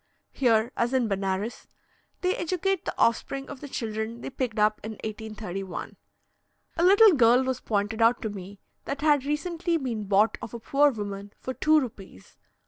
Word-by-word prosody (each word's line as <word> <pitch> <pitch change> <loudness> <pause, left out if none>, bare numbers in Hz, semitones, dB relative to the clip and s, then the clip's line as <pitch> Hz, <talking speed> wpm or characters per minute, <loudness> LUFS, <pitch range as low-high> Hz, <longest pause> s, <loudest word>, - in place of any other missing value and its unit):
Here, 235 -2 +2
as 240 +3 0
in 250 -3 +2
Benares, 195 +2 -2 0.5
they 365 0 +1
educate 365 +2 -1
the - - -3
offspring 270 +4 +1
of 285 -3 -9
the 290 - -7
children 225 0 -4
they - - -6
picked 255 -4 -3
up 210 0 +2
in 220 +1 -5
1831. 210 -4 -6 0.8
A 335 - 0
little 405 +4 +8
girl 250 -4 +5
was 260 -1 -2
pointed 215 +1 -1
out 230 +2 +4
to 220 - -1
me 195 0 -9 0.3
that 280 - -4
had 295 -3 +3
recently 335 +3 -1
been 235 -8 -3
bought 205 +2 +3
of 230 - -7
a - - -5
poor 285 +5 +3
woman 205 -4 -6
for 260 - -5
two 310 +3 +4
rupees 200 - -8
(4s.) - - -47
235 Hz, 175 wpm, -27 LUFS, 210-280 Hz, 0.8 s, little